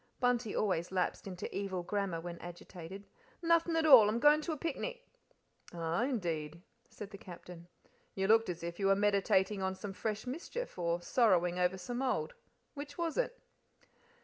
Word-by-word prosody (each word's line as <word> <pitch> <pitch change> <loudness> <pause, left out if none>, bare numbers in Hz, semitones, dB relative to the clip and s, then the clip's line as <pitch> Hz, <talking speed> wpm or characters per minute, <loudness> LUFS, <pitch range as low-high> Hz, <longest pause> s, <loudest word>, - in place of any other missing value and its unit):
Bunty 245 -3 +1
always 180 -5 0
lapsed 185 +1 -1
into 185 -2 -5
evil 190 -3 -2
grammar 195 -2 -2
when 170 0 -7
agitated. 175 +2 -9 0.4
"Nothing 335 0 +3
at 325 -1 +2
all. 250 -9 +9
I'm 220 - 0
goin' 295 +5 +5
to 325 - -3
a 310 - -3
picnic." - - -4 0.7
"Ah, 170 +6 0
indeed!" 170 - -3 0.3
said 210 -1 -9
the 200 - -9
Captain. 175 -1 -11 0.5
"You 195 - 0
looked 225 0 +5
as 175 -1 -5
if 170 +2 -5
you 195 - +2
were 195 - +5
meditating 200 -1 +2
on 190 0 -1
some 195 0 -6
fresh 215 +2 -3
mischief, 335 - -5
or 170 0 0
sorrowing 180 -6 +3
over 180 +1 +2
some 240 +7 -4
old 265 - -1 0.4
which 285 -1 -8
was 335 -2 -1
it?" - - -1
200 Hz, 170 wpm, -33 LUFS, 180-255 Hz, 0.7 s, all